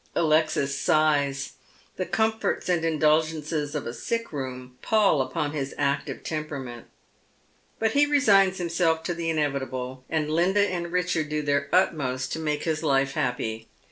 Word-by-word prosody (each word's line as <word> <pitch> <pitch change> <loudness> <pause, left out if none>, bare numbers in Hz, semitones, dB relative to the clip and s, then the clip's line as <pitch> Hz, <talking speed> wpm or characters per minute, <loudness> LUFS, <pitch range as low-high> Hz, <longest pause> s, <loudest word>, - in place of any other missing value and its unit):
Alexis 155 -3 +2
sighs. 145 -2 +1 0.5
The 185 - -2
comforts 220 0 0
and 175 -2 +1
indulgences 155 -1 +1
of 150 - -3
a 120 - -4
sick 230 - -3
room 130 -2 -6
pall 205 -10 +3
upon 145 +3 -2
his 140 -3 -4
active 140 0 -1
temperament. 140 -6 -5 0.9
But 225 0 +1
he 290 +3 +4
resigns 200 -10 +4
himself 165 -2 0
to 175 - -2
the 170 -1 -3
inevitable, 130 -4 -2
and 155 -2 0
Linda 190 +5 +3
and 170 -2 -3
Richard 180 -4 0
do 150 0 -1
their 140 0 0
utmost 130 -8 +1
to - - -3
make 150 -2 -2
his 160 -2 -1
life 140 -3 +2
happy. 115 -3 -3
155 Hz, 145 wpm, -26 LUFS, 140-170 Hz, 0.9 s, he